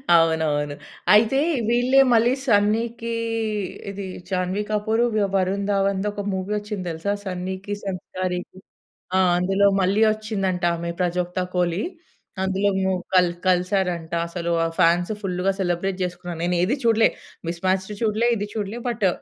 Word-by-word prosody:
అవునవును. 160 -3 +2 0.4
అయితే 220 +5 +5 0.3
వీళ్ళే 245 +3 +4
మళ్ళీ 235 +2 +4
'సన్నీకి' 230 +1 +1 0.8
ఇది 200 0 -5 0.2
'జాహ్నవి 185 +2 -1
కపూర్', 220 +2 +1
వి 215 - +2
'వరుణ్ 195 +1 +1
ధావన్‌ది' 195 0 +1
ఒక 205 -1 -5
మూవీ 190 +2 -3
వచ్చింది 205 -3 -5
తెలుసా? 165 +5 -2
'సన్నీ‌కి' 190 +2 -4
సంస్కారికి. 185 -1 -4 0.6
ఆ! - - +4 0.2
అందులో 195 +3 +2
మళ్ళీ 195 +4 +2
వచ్చిందంట 195 -4 -2
ఆమె 170 0 -4
'ప్రజోక్త 180 0 -1 0.2
కోలి'. 180 +1 +1 0.6
అందులో 190 +1 +1
మో 190 0 +1 0.2
కల్ 180 -2 +5
కలిసారంట. 180 -2 +1 0.2
అసలు 170 0 -3
ఆ - - -1
ఫాన్స్ 175 +2 +3
ఫుల్‌గా 185 0 0
సెలబ్రేట్ 185 +1 -1
చేసుకున్నారు. 175 -2 -6
నేను 175 0 +1
ఏది 230 +10 +1
చూడలే. 225 -1 +5 0.4
మిస్ 170 +1 -5
మ్యాచ్డ్ 190 +2 0
చూడలే. 220 +2 +2
ఇది 205 0 -3
చూడలే. 215 +2 -3
బట్టు 220 -5 +1
190 Hz, 135 wpm, -23 LUFS, 180-210 Hz, 0.8 s, అయితే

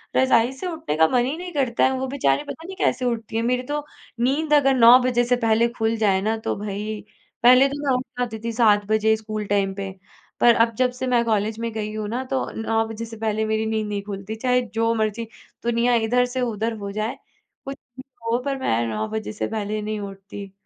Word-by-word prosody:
रज़ाई 250 -2 +4
से 270 +8 -6
उठने 320 - -3
का 160 0 +6
मन 245 +3 +2
ही 270 +4 -2
नहीं 355 0 -7
करता 260 -6 +1
है, 265 - +3
वो 265 +1 -2
बेचारी 250 - +1
पता 325 - -8
नहीं 380 +2 -7
कैसे 260 -8 0
उठती 230 -2 -3
हैं? 225 - +1
मेरी 250 +1 0
तो 295 +3 -3 0.3
नींद 290 +5 +1
अगर 275 -2 +5
9 240 0 +8
बजे 245 -1 +2
से 245 +1 +2
पहले 225 +1 +4
खुल 225 0 +1
जाए 200 -3 +2
ना, 220 +3 0
तो 220 - -3
भई 210 +1 -4 0.4
पहले 255 +3 +7
तो 285 +1 -5
मैं 265 - +3
उठ 250 - -3 0.2
जाती 230 -3 -2
थी 230 - -2
7 215 -3 +3
बजे 220 0 +3
स्कूल 215 -1 -5
टाइम 195 -1 +1
पे, 195 0 -5 0.5
पर 235 -1 +6
अब 230 - -10
जब 255 -1 +2
से 260 - -2
मैं 245 -2 +3
कॉलेज 215 0 0
में 230 0 -3
गई 215 -1 -4
हूँ 215 -1 -3
ना, 245 +4 -2
तो 260 0 -2
9 225 0 +1
बजे 225 +1 -6
से 225 0 -10
पहले 220 0 -1
मेरी 220 0 0
नींद 220 -1 -1
नहीं 205 -1 -3
खुलती, 200 +1 -6
चाहे 250 +2 +1
जो 230 +1 +1
मर्ज़ी 220 +1 -1 0.4
दुनिया 235 +1 +2
इधर 235 +2 +2
से 255 - 0
उधर 225 -1 -1
हो 200 -1 -6
जाए, 215 +3 -3 0.5
कुछ 275 0 -5 0.2
भी 260 - -8 0.3
हो 235 - +3
पर 275 -1 -1
मैं 120 - 0
9 110 -1 -2
बजे 220 -1 -4
से 210 - -3
पहले 215 -1 -3
नहीं 215 0 -3
उठती। 195 0 -8
225 Hz, 230 wpm, -23 LUFS, 215-250 Hz, 0.5 s, 9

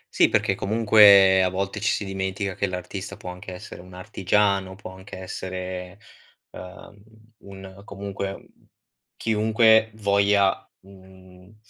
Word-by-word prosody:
Sì, - - +4
perché - - +1
comunque 100 -3 +5
a 95 - +2
volte 95 +3 -4
ci 110 - 0
si 105 - -2
dimentica 95 0 -4
che 100 - -2
l'artista 95 +2 -7
può 90 -3 -8
anche 90 +1 -10
essere 90 -1 -10
un 90 0 -15
artigiano, 95 +1 -1
può 95 -1 -11
anche 95 +1 -12
essere, 95 0 -7 0.5
uhm, 95 +2 -13 0.4
un 95 0 -13
comunque, 100 -1 -7 0.7
chiunque 110 0 +3
voglia, 100 -1 +1
mhmm 95 0 -18
95 Hz, 125 wpm, -23 LUFS, 95-100 Hz, 0.7 s, comunque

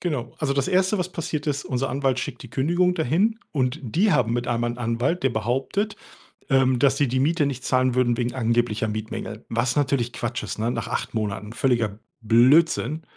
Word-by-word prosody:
Genau 140 -9 -3
also, 145 -3 0
das 140 -1 0
Erste, 190 +2 +2
passiert 165 -4 -3
ist: 145 -1 -2
Unser 130 +1 -1
Anwalt 135 -2 0
schickt 125 -1 -6
die - - -11
Kündigung 175 +6 +1
da 165 - 0
hin, 200 - +1
und 130 +1 -1
die 180 - +1
haben 125 -6 +2
mit 120 +1 -1
einemal 120 0 0
'n 120 - -7
Anwalt, 120 +9 -1
der 135 - +4
behauptet, 135 - -1 0.5
ähm, 130 -2 +3
dass 135 +1 +3
sie 145 - +2
die 130 +2 0
Miete 155 +3 +2
nicht 130 -3 -3
zahlen 130 -1 +2
würden 120 -1 +2
wegen 120 -1 -1
angeblicher 115 -3 0
Mietmängel, 110 +1 -5
was 120 +2 0
natürlich 135 -4 +1
Quatsch 120 0 -3
ist, - - -5
ne, 115 +2 0
nach - - -3
8 - - -3
Monaten 105 -1 -3
völliger 115 -6 0 0.2
Blödsinn. 145 +7 +4
130 Hz, 195 wpm, -24 LUFS, 120-150 Hz, 0.5 s, der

